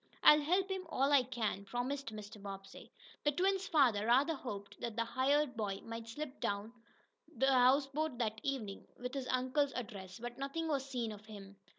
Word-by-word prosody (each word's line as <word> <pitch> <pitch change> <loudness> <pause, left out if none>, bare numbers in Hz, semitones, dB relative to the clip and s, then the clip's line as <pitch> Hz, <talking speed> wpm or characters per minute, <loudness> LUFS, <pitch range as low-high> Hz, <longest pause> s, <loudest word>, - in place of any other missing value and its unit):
"I'll 300 0 +9
help 365 +6 +2
him 380 -1 -2
all 275 -2 +2
I 285 -2 +7
can," 230 -5 -2
promised 245 +6 -3
Mr. 210 -1 -9
Bobbsey. 195 -1 -9 0.3
The 295 - +3
twins' 385 +4 +1
father 245 - +4
rather 270 +7 +4
hoped 205 -8 -7
that 235 -2 -3
the 230 - +1
hired 265 +3 +2
boy 205 -3 -2
might 230 0 -6
slip 275 +4 -6
down 205 +3 -2 0.7
to 265 - +4
the 270 - +4
houseboat 275 +3 +3
that 220 -2 -1
evening, 220 -8 -3
with 250 +1 -5
his 270 -2 -3
uncle's 260 +2 +1
address, 200 -6 -6
but 240 +2 -7
nothing 280 +4 -2
was 275 -3 -1
seen 240 -4 -2
of 210 0 -11
him. 200 -2 -10
250 Hz, 185 wpm, -35 LUFS, 215-280 Hz, 0.7 s, I'll